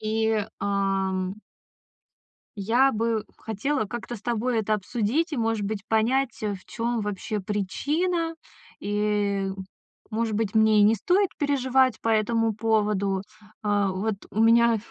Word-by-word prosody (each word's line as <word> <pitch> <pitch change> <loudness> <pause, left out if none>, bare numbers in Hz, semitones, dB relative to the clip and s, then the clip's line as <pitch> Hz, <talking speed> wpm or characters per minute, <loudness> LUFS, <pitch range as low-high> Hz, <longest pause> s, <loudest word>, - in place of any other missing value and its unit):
И, 220 -1 0
ам 195 -2 0 1.3
я 240 +7 +3
бы 225 -1 0
хотела 225 +4 -2
как-то 240 +3 -6
с 200 - -12
тобой 240 0 0
это 215 0 0
обсудить 235 - -1
и, 290 - -2
может 225 -2 0
быть, 210 -1 -4
понять, 235 +3 +1
э, 210 -2 -1
в 185 - -15
чём 235 -1 -2
вообще 210 +1 -3
причина. 305 - -1 0.4
И, 205 -1 0 0.6
может 220 0 -1
быть, 215 0 -1
мне 220 -1 +5
и - - +6
не 215 +2 +5
стоит 365 - +2
переживать 265 -2 +2
по 225 - 0
этому 225 +1 +2
поводу. 210 -3 +1 0.4
А 205 -2 +1
вот 200 +3 -1 0.2
у 220 +3 +2
меня 235 0 +5
220 Hz, 135 wpm, -25 LUFS, 205-235 Hz, 1.3 s, и